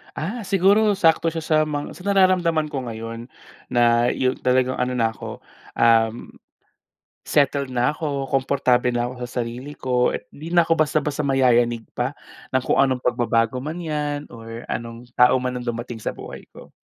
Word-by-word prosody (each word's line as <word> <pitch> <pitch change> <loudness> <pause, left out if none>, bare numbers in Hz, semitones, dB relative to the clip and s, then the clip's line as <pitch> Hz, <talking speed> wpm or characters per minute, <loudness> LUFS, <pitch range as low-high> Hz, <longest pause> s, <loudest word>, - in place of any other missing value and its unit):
Ah, 210 +8 -4
siguro 200 +3 +4
sakto 165 -3 +2
siya 165 - -3
sa 155 0 +1
mga 145 -1 -5
sa 185 - -13
nararamdaman 185 -5 +3
ko 135 -3 -4
ngayon, 115 0 -6 0.5
na 120 0 +3
yung 130 0 0
talagang 130 0 +2
ano 125 0 -1
na 115 -2 +1
'ko, 110 - -9 0.3
um, 115 0 +2 1.0
settled 140 -1 +2
na 120 0 +2
ko, 145 -3 -3
komportable 130 -2 +2
na 120 +1 -1
ako 125 -1 -6
sa 120 0 -3
sarili 125 +5 -7
ko 125 -2 0
at - - -4
'di 165 +4 -7
na 170 - +6
ko 165 0 +1
basta-basta 150 -1 0
mayayanig 120 -3 +3 0.2
pa - - -1 0.4
ng 130 - +3
kung - - +1
anong 130 -2 +2
pagbabago 120 -1 +1
man 155 +6 -5
yan 150 -2 -3
or 115 0 -9
anong 115 0 -5 0.2
tao 125 +1 +6
man 125 0 -2
ang 125 - -8
dumating 120 0 -4
sa - - -4
buhay - - -10
ko. - - -14
130 Hz, 170 wpm, -22 LUFS, 120-155 Hz, 1.0 s, na